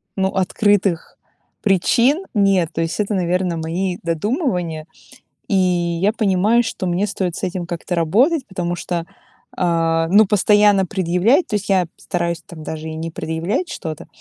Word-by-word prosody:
ну, 190 -1 +1
открытых 195 -1 0 0.4
причин 235 - +2
нет. 195 -6 +2
То 165 - -1
есть 165 +4 -3
это, 210 0 0
наверное, 180 -1 0
мои 175 +3 -2
додумывания. 170 - -2 0.6
И - - 0
я 180 +1 +1
понимаю, 215 +1 +2
что 225 -5 -4
мне 180 +3 0
стоит 185 -4 -3
с - - -7
этим 180 -1 -3
как-то 175 +1 -4
работать, 250 - +2
потому 175 -2 -3
что, 175 -1 -3 0.5
а, 165 -2 +1
ну, 205 +4 +6
постоянно 205 0 +4
предъявлять- 190 - +2
то 215 - 0
есть, 205 - -5
я 190 -3 +3
стараюсь 170 -2 -3
там 165 -3 -11
даже 160 +1 -6
и 160 - -5
не 165 +1 -4
предъявлять 165 - -2
что-то,- 155 -3 -6
185 Hz, 150 wpm, -19 LUFS, 170-205 Hz, 0.6 s, ну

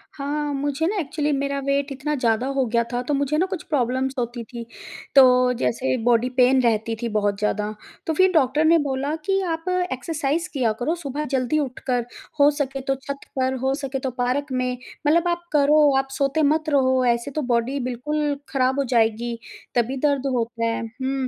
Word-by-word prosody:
हाँ, 290 0 -2
मुझे 285 +3 -1
ना 410 - -1
एक्चुअली 300 -1 -1
मेरा 280 0 -1
वेट 280 0 0
इतना 280 +3 -3
ज़्यादा 240 -1 +1
हो 265 - +2
गया 235 0 +3
था, 245 - 0
तो 270 +4 -2
मुझे 280 +2 0
ना 355 - +3
कुछ 375 -4 -5
प्रॉब्लम्स 260 -2 0
होती 240 -1 -3
थीं, 235 +1 -8 0.5
तो 250 -2 +6
जैसे 255 +2 0
बॉडी 245 +1 +3
पेन 255 +1 +5
रहती 225 -1 +1
थी 235 - -2
बहुत 205 -2 0
ज़्यादा। 210 0 -1 0.4
तो 320 - +1
फिर 375 +3 +4
डॉक्टर 300 0 +3
ने 330 +1 +6
बोला 275 +3 -1
कि, 390 0 +2
"आप 330 0 -3 0.2
एक्सरसाइज़ 300 +4 -2
किया 245 -5 +1
करो 305 +7 0
सुबह 300 -2 -4
जल्दी 260 +4 +1
उठकर, 250 -3 -2 0.3
हो 285 +1 +7
सके 275 -2 -3
तो 270 +1 -1
छत 275 +1 -6 0.2
पर, 260 0 +1
हो 265 0 +1
सके 275 -2 -4
तो 260 -1 -3
पार्क 260 +3 -1
में। 255 -1 -1 0.3
मतलब 335 +3 +3
आप 345 0 -2
करो, 295 +1 +5 0.2
आप 270 - 0
सोते 275 +3 0
मत 310 +2 +2
रहो, 260 -2 +3
ऐसे 235 +4 -5
तो 305 +2 -2
बॉडी 245 +4 0
बिल्कुल 290 +4 -1
खराब 265 0 +1
हो 280 - +2
जाएगी, 230 +1 +1 0.4
तभी 245 +3 +1
दर्द 280 -2 0
होता 230 -1 -1
है।" 230 0 -1
हुँ, 260 +3 -3
270 Hz, 190 wpm, -23 LUFS, 250-295 Hz, 0.5 s, हो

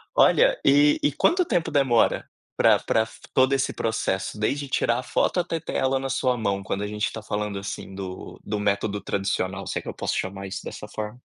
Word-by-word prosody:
Olha, - - +5
e 145 +1 +5
e 145 - +3
quanto 360 - +3
tempo 175 - 0
demora 130 -6 +2 0.3
pra - - +5
pra 110 - +1
f 110 - -15
todo 130 +1 +3
esse 135 0 +1
processo, 105 -2 -2
desde 140 +7 -1
tirar 120 -2 +1
a 125 - -3
foto 180 - +1
até 170 -1 -1
ter - - -6
ela 135 0 +1
na 135 0 -3
sua 130 -1 +1
mão, 100 -4 -1
quando 95 +1 -3
a - - -2
gente 105 0 -1
está 110 - -5
falando, 105 -1 -3
assim, 100 -1 -6
do 95 -1 -7
do 105 0 -3
método 100 0 0
tradicional, 95 -1 -2
se - - -2
é - - -2
que - - -14
eu - - -5
posso - - -2
chamar 95 +1 -4
isso 95 - -6
dessa - - -7
forma. 110 +3 -6
110 Hz, 215 wpm, -25 LUFS, 100-135 Hz, 0.3 s, Olha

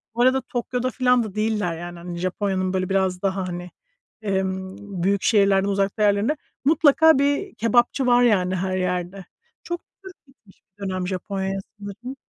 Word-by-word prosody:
Bu 240 - 0
arada 260 +2 +4
Tokyo'da 250 0 -2
filan 250 -2 +2
da 215 -3 -7
değiller, 210 -6 -1
yani. 175 +1 -7
Hani, 175 0 -7
Japonya'nın 185 +1 -1
böyle 185 -1 -1
biraz 190 -2 0
daha 190 -1 -1
hani, 175 0 -6 0.5
emm, 190 -1 -3
büyük 200 +1 +1
şehirlerden 200 -2 +3
uzakta 200 +2 0
yerlerinde. 205 +8 +2 0.3
Mutlaka 315 0 +5
bir 285 +8 0
kebapçı 240 +3 +2
var, 245 0 +5
yani, 190 -6 +2
her 185 0 -1
yerde. 180 +1 -3 0.4
Çok 345 0 -4 0.2
Türk 380 -1 -11
gitmiş 235 -7 -24 0.2
bir - - -8
dönem 185 -1 -2
Japonya'ya 195 +1 -3 0.2
sanırım. 205 +6 -8
200 Hz, 155 wpm, -23 LUFS, 185-245 Hz, 0.5 s, Mutlaka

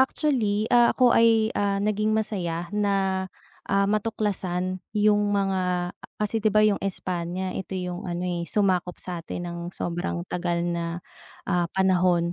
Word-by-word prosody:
actually, 240 -7 +1
ah, 240 -1 +5
ako 250 -2 +5
ay, 225 -1 +4
ah, 200 -1 0
naging 215 +1 +1
masaya 175 -5 -2
na, 195 -2 0 0.4
ah, 200 0 +3
matuklasan 195 -3 -1 0.2
'yong 210 0 +3
mga 180 -2 0
ah, - - -16
kasi, 210 +1 -1
'di 215 - +3
ba, 215 0 +4
'yong 210 -2 +2
Espanya, 185 -1 -3
ito 190 +1 -5
'yong 180 0 -4
ano, 175 +1 -3
eh, 175 -1 -2
sumakop 185 -4 +1
sa'tin 175 -1 -6
ng 170 0 -5 0.2
sobrang 175 0 -3
tagal 175 -1 -2
na, 170 0 -2 0.4
ah, 175 -2 0
panahon. 180 -2 +3
190 Hz, 145 wpm, -25 LUFS, 175-210 Hz, 0.4 s, ah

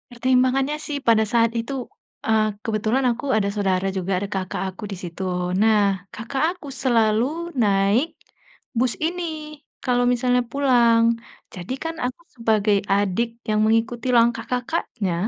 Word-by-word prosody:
Pertimbangannya 255 +3 +2
sih 295 - -2
pada 225 -1 +5
saat 230 -1 +4
itu, 230 +5 -4 0.5
eee, 220 -1 +4 0.2
kebetulan 225 +4 0
aku 240 - -8
ada 200 -2 +1
saudara 190 -2 0
juga, 190 0 -2
ada 200 - -3
kakak 185 -1 -3
aku 190 +3 -11
di - - -3
situ. 175 +2 -6 0.4
Nah, 220 -1 +5 0.3
kakak 240 +6 -3
aku 360 -5 -11 0.2
selalu 225 -3 +3 0.4
naik 200 +7 +3 0.7
bus 250 -1 +2
ini 355 +2 -2 0.6
kalau 245 -1 +2
misalnya 250 0 +2
pulang, 240 -4 +4 0.5
jadi 180 +6 -5
kan 325 0 -3
aku 250 +5 -4 0.2
sebagai 215 -3 +2 0.2
adik 205 +3 +1 0.2
yang 215 0 +2
mengikuti 225 +3 +1
langkah 230 0 +3
kakaknya, 245 - -2
230 Hz, 140 wpm, -23 LUFS, 210-255 Hz, 0.7 s, pada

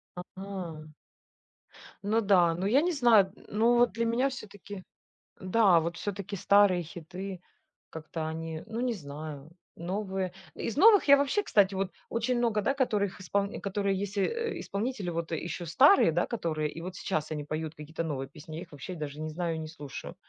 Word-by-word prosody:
А. 180 -4 -7 1.1
Ну 220 +3 +2
да, 180 -5 +4
ну, 180 +3 -3
я 245 +8 +4
не 355 +3 +1
знаю, 240 - +6
н - - -18
ну, 230 +3 +3
вот 240 0 +4
для 230 0 -1
меня 240 +4 +2
все-таки 205 -5 -9 0.6
да, 185 -2 +4
вот 170 +2 -3
все-таки 200 0 -4
старые 200 -2 +4
хиты 180 +3 -7 0.5
как-то 160 0 -5
они, 160 0 -5
ну, 225 +1 -4
не 250 -1 +1
знаю. 150 -3 -8 0.2
Новые, 190 0 -3 0.2
из 230 - -4
новых 415 +4 +7
я 280 - +9
вообще, 285 +9 +1
кстати, 200 - +3
вот 190 -1 -2 0.2
очень 240 +2 0
много, 230 -3 +1
да, 275 +7 +1
которых 210 -7 0
исполн 200 +2 -1
которые 200 -1 -1
есть, 200 0 -3
э, 465 - -1
исполнители 205 -2 -3
вот 170 0 -3
еще 170 +2 -3
старые, 260 - +6
да, 175 +2 +1
которые 160 -9 -2
и - - -8
вот 185 +1 -6
сейчас 155 -6 -2
они 150 -1 -3
поют 155 +1 -4
какие-то 160 +2 -5
новые 135 -4 -3
песни, 155 +2 -10
я - - -5
их 180 - -11
вообще 145 +6 -7
даже 150 -3 -6
не 155 0 -3
знаю 165 +1 -2
и - - -4
не 155 - -5
слушаю. 150 -4 -8
190 Hz, 180 wpm, -29 LUFS, 160-215 Hz, 1.1 s, я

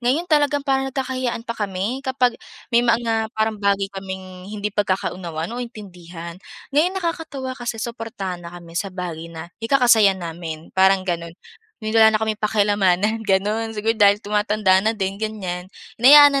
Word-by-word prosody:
Ngayon 260 +8 +1
talagang 290 -3 +2
parang 270 -1 +1
nagkaka-hiyaan 260 -3 -3
pa 235 - -3
kami 205 +3 -3
kapag 260 -3 0 0.3
may 235 - +6
mga 230 -2 +1
parang 220 -1 0
bagay 200 0 +2
kaming 190 -1 -8
hindi 210 -1 -4
pagkakaunawan 185 -3 -2
o 245 - -4
intindihan. 180 -6 -9 0.3
Ngayon 345 +6 +2
nakakatuwa 325 -7 -3
kasi 245 -2 -4
suportahan 225 -6 -5
na 170 - -8
kami 170 -1 -12
sa 185 +4 -2
bagay 175 -3 -6
na 165 +1 -9
ikaka-saya 225 -5 +4
namin, 165 -2 -7
parang 190 0 +4
ganon. 170 -1 -4 0.5
Yung 215 - -2
wala 220 -1 +7
na 215 - +1
kaming 220 -1 -2
paki-alamanan, 205 0 +2
ganon. 210 +4 +1
Siguro 220 +2 +1
dahil 205 -1 +5
tumatanda 210 -2 +2
na 220 - +2
din 195 -1 -2
ganyan, 185 -5 -4 0.3
hinayaan 285 +2 +8
210 Hz, 155 wpm, -21 LUFS, 185-240 Hz, 0.5 s, hinayaan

